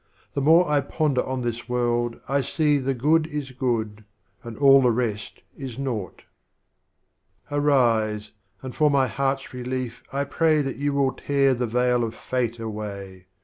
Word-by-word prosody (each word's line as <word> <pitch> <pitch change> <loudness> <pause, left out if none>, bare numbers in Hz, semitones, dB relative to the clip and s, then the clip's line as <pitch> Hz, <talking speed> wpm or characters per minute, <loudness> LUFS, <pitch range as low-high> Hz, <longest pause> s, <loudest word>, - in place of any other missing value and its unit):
The 140 - -1
more 165 +5 +5
I 150 -1 +2
ponder 140 -2 0
on 130 0 -3
this 120 0 -4
World 120 -1 0
I 140 +1 +1
see 150 +1 +1
The 135 0 -1
Good 155 +6 +2
is 150 -4 -5
Good, 115 -5 -2 0.4
and 115 -2 -8
all 135 -1 +7
the 125 - +4
rest 110 -4 -3
is 130 -4 -7
Naught. 120 -9 -4 1.3
Arise, 115 -7 +1 0.3
and 130 -1 -7
for 150 -1 +3
my 140 -2 +3
Heart's 135 +4 -2
Relief 125 -1 -4
I 140 +1 -1
pray 155 +1 +2
Tliatyou 140 +1 -2
will 140 -2 +1
tear 140 -1 +1
the 125 -1 -2
Veil 125 +1 +1
of 115 -1 -4
Fate 120 -2 -2
away. 100 -4 -7
130 Hz, 155 wpm, -24 LUFS, 115-140 Hz, 1.3 s, all